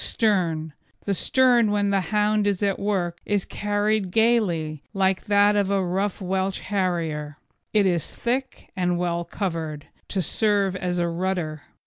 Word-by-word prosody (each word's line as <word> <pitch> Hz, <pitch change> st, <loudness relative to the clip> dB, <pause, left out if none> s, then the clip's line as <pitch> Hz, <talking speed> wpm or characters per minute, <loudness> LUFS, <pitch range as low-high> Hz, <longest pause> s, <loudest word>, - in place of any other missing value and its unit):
STERN 170 Hz, -8 st, +1 dB, 0.3 s
The 200 Hz, -, +1 dB
stern 245 Hz, +1 st, +3 dB
when 205 Hz, -1 st, +1 dB
the 195 Hz, -1 st, +2 dB
hound 210 Hz, 0 st, +2 dB
is 200 Hz, 0 st, 0 dB
at 200 Hz, -1 st, +1 dB
work 180 Hz, -4 st, -1 dB
is 205 Hz, -2 st, 0 dB
carried 205 Hz, -1 st, 0 dB
gaily, 180 Hz, -9 st, +1 dB
like 190 Hz, -1 st, +1 dB
that 205 Hz, 0 st, +4 dB
of 200 Hz, -2 st, +1 dB
a 195 Hz, -2 st, +1 dB
rough 190 Hz, +3 st, -1 dB
Welsh 190 Hz, 0 st, -1 dB
Harrier. 165 Hz, -7 st, -2 dB, 0.3 s
It 210 Hz, -2 st, +3 dB
is 175 Hz, -4 st, 0 dB
thick 255 Hz, +2 st, -3 dB
and 180 Hz, -2 st, 0 dB
well 170 Hz, -1 st, -1 dB
covered, 165 Hz, -6 st, -4 dB, 0.2 s
to 195 Hz, -, -2 dB
serve 200 Hz, +1 st, +1 dB
as 180 Hz, -1 st, -2 dB
a 175 Hz, -1 st, +1 dB
rudder. 170 Hz, -3 st, -2 dB
190 Hz, 150 wpm, -24 LUFS, 175-205 Hz, 0.3 s, that